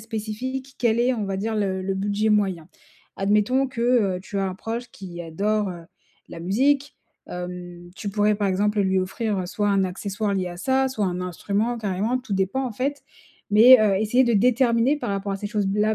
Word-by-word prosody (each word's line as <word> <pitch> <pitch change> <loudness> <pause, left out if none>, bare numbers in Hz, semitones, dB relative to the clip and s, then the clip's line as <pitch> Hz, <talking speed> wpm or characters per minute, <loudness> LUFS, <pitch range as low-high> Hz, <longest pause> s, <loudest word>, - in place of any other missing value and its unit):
spécifiques, 240 +5 -5
quel 235 -1 +2
est, 250 +1 +2
on 215 -3 -2
va 195 -1 -3
dire, 220 +3 -2
le 190 -2 -1
le 195 +1 -2
budget 205 +2 0
moyen. 190 -6 +1 0.5
Admettons 210 +7 +2
que, 235 - -7 0.4
heu, 180 - -7
tu 200 - -7
as 195 - 0
un 185 - -4
proche 235 +3 -5
qui 175 -3 -8
adore, 200 +5 -1
heu, 170 -2 -9 0.4
la 165 - -9
musique, 275 - +1 0.3
hem, 180 -1 -7
tu 205 - -5
pourrais 210 +1 +2
par 205 -2 0
exemple 205 +2 +1
lui 190 -1 +2
offrir 190 0 -2
soit 205 +1 -1
un 195 -1 +2
accessoire 200 +2 -3
lié 185 -2 -1
à 175 - -8
ça, 265 +5 +1
soit 225 -6 -2
un 180 0 -2
instrument, 205 +6 -2
carrément. 210 +4 -1
Tout 250 -4 -7
dépend, 195 +8 0
en 245 - -5
fait, 275 +6 -3 0.5
mais, 235 +5 +9
heu, 200 -3 +3
essayer 245 +5 +3
de 235 - +1
déterminer 245 +4 +3
par 240 -6 -3
rapport 200 0 -2
à 195 - -2
ces 205 - -5
choses-là 210 0 +1
210 Hz, 200 wpm, -24 LUFS, 190-235 Hz, 0.5 s, mais